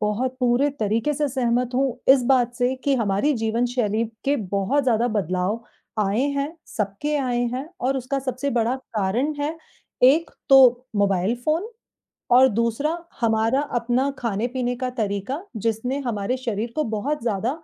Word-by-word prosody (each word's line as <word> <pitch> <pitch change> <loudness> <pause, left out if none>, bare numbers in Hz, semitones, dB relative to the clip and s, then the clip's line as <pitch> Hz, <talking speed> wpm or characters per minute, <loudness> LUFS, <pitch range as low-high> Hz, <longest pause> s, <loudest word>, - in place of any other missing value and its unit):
बहुत 230 +5 -1
पूरे 250 +3 +3
तरीके 220 +7 +1
से 295 +1 0
सहमत 245 -1 0
हूँ 260 -2 0
इस 270 - +3
बात 245 -2 +2
से 245 +2 +1
कि 280 - +3
हमारी 215 +6 +1
जीवन 225 +1 0
शैली 230 -3 0 0.2
के 280 +1 +2 0.2
बहुत 200 +9 +1
ज़्यादा 240 -1 +2
बदलाव 190 +4 -1 0.3
आए 205 +3 +1 0.2
हैं, 285 +4 -2
सबके 210 +9 -2
आए 245 -3 0
हैं 270 +5 -4
और 270 +2 0
उसका 265 +2 -2
सबसे 265 +1 -3
बड़ा 240 +1 +1 0.2
कारण 225 +9 0
है 305 +3 -2 0.5
एक 320 +5 +2 0.2
तो 255 -2 +6
मोबाइल 200 +2 +2
फ़ोन 330 +8 0 0.7
और 260 +1 +7
दूसरा 235 +8 0 0.2
हमारा 225 +3 +2 0.2
अपना 245 +4 0
खाने-पीने 245 +3 -1
का 255 0 -2
तरीका 220 - -3 0.2
जिसने 235 +5 -1
हमारे 210 +2 -1
शरीर 235 -2 -3
को 305 - +1
बहुत 285 +7 -2
ज़्यादा 225 0 0
245 Hz, 155 wpm, -23 LUFS, 220-270 Hz, 0.7 s, और